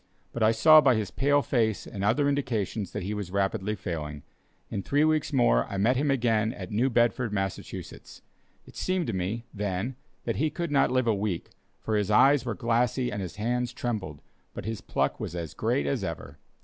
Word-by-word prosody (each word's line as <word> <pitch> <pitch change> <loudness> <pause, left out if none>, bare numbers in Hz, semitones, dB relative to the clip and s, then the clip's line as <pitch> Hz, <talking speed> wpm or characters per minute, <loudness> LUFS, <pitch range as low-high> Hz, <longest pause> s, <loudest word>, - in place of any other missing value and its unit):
But 120 - -4
I 110 0 +5
saw 155 +7 +7
by 135 -4 +4
his 105 -4 -2
pale 145 +6 +2
face 110 -5 0
and 100 - -6
other 120 +8 +2
indications 115 -8 -1
that - - -4
he 100 +3 -3
was 105 -3 -4
rapidly 100 +2 -1
failing. 75 -6 -5 0.5
In 100 - -2
three 145 +8 +2
weeks 155 -1 +1
more, - - +3
I 100 - -5
met 115 +6 +3
him 145 +3 +1
again 115 -4 +1
at 95 -2 -8
New 120 +6 +2
Bedford, 120 -1 +1
Massachusetts. 95 -2 -5 0.4
It - - -16
seemed 185 -2 -1
to 115 - -3
me, 95 +6 -3
then, 105 +4 -2 0.3
that - - -2
he 155 - +1
could 170 +1 -4
not 140 - +3
live 130 -1 +1
a 115 - +3
week, 100 -3 -3 0.3
for 110 - -1
his 105 -1 0
eyes 135 +5 +5
were 115 -4 -2
glassy 120 +4 0
and 105 -1 -3
his 90 -3 -6
hands 120 +3 -1
trembled, 95 -12 -4 0.3
but - - -6
his 110 -1 -4
pluck - - -1
was 85 - -5
as 85 -4 -5
great 70 - 0
as 70 - -1
ever. 70 +1 -6
110 Hz, 200 wpm, -27 LUFS, 95-125 Hz, 0.5 s, saw